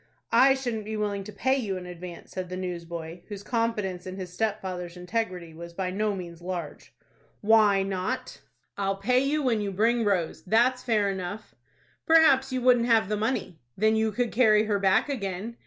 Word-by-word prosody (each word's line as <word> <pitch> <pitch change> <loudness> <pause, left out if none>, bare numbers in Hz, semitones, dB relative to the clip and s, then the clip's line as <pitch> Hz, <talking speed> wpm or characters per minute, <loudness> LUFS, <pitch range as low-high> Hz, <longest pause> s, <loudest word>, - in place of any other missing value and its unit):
"I 270 +1 +6
shouldn't 240 -5 -3
be 215 0 -4
willing 205 -2 -2
to 210 - -8
pay 260 +6 +1
you 205 -7 -2
in 180 - -7
advance," 180 -1 -9
said 185 -1 -5
the 185 - -5
newsboy, 170 -2 -6
whose 205 -2 -7
confidence 210 -7 -2
in 185 - -6
his 185 -2 -7
stepfather's 185 -4 -3
integrity 180 -3 -3
was 170 +1 -9
by 185 +1 -2
no 210 +1 0
means 170 -2 -8
large. 175 -4 -6 0.5
"Why 210 -2 +5
not?" 190 -1 -3 0.4
"I'll 195 0 0
pay 245 +6 +2
you 285 +3 0
when 235 -5 +1
you 200 -1 -2
bring 230 +4 +2
Rose. 180 -6 0
That's 240 +7 +3
fair 215 -5 +1
enough." 190 +3 -6 0.5
"Perhaps 275 -5 +5
you 255 -1 -2
wouldn't 245 -2 +4
have 225 -4 +3
the 210 - +1
money." 210 -6 -2 0.2
"Then 220 +2 +3
you 220 0 +1
could 240 +2 -1
carry 215 -3 +4
her 210 -2 0
back 195 +6 +3
again." 220 -3 -4
205 Hz, 185 wpm, -27 LUFS, 185-230 Hz, 0.5 s, I